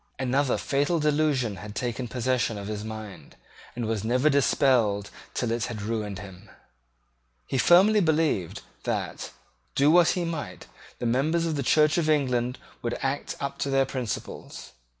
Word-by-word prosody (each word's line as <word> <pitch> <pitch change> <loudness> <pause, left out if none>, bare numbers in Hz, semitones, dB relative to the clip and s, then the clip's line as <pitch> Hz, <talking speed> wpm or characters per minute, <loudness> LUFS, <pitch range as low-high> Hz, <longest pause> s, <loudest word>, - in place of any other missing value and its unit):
Another 130 +1 +1
fatal 145 +5 0
delusion 145 -8 +1
had 105 +1 -9
taken 125 0 -3
possession 125 -1 0
of 100 - -6
his 105 0 -4
mind, 110 -8 -8 0.4
and 120 -1 -3
was 110 -2 -2
never 125 +6 +2
dispelled 120 -7 +2 0.2
till 120 -2 -1
it 115 -2 0
had 110 -3 -5
ruined 105 -2 -3
him. 95 +1 -11 1.0
He 135 - -1
firmly 190 - +6
believed 160 - 0 0.2
that, - - -3 0.5
do 145 +2 +4
what 175 -1 +6
he 175 - 0
might, 165 -3 -5 0.3
the - - -4
members 150 +8 +1
of 160 -2 -1
the 140 - -1
Church 150 +4 +3
of 155 -2 0
England 125 -4 +1 0.2
would 120 - -2
act 135 +1 -2
up 140 0 -4
to 140 - -1
their 135 0 +3
principles. 115 - -6
125 Hz, 155 wpm, -26 LUFS, 110-150 Hz, 1.0 s, firmly